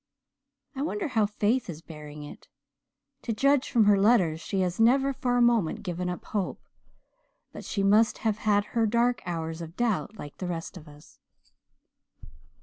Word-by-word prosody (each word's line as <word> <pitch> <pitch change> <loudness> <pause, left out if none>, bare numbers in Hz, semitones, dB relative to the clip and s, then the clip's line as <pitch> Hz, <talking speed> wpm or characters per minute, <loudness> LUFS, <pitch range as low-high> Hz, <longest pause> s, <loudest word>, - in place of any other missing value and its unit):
I 270 - -4
wonder 330 +3 -2
how 220 -5 +2
Faith 210 +3 0
is 165 -1 -7
bearing 150 -2 -10
it. 145 - -12 0.7
To 230 - -3
judge 275 +4 +2
from 230 -4 +3
her 205 -1 +5
letters 190 -7 +3
she 195 +2 -2
has 180 +1 -2
never 265 +4 +4
for 245 -1 0
a 245 - +4
moment 230 -8 +2
given 180 -1 -3
up 180 - -6
hope, 200 -4 -3 0.9
but - - -9
she 200 - -2
must 215 +3 +4
have 215 -1 +1
had 205 -2 +2
her 230 -1 +2
dark 240 +2 +1
hours 165 -1 -4
of 165 +2 -9
doubt 220 -2 -1
like 145 -5 -9
the 185 - -3
rest 170 0 -5
of 165 -3 -11
us." 150 0 -17
205 Hz, 170 wpm, -27 LUFS, 170-235 Hz, 0.9 s, her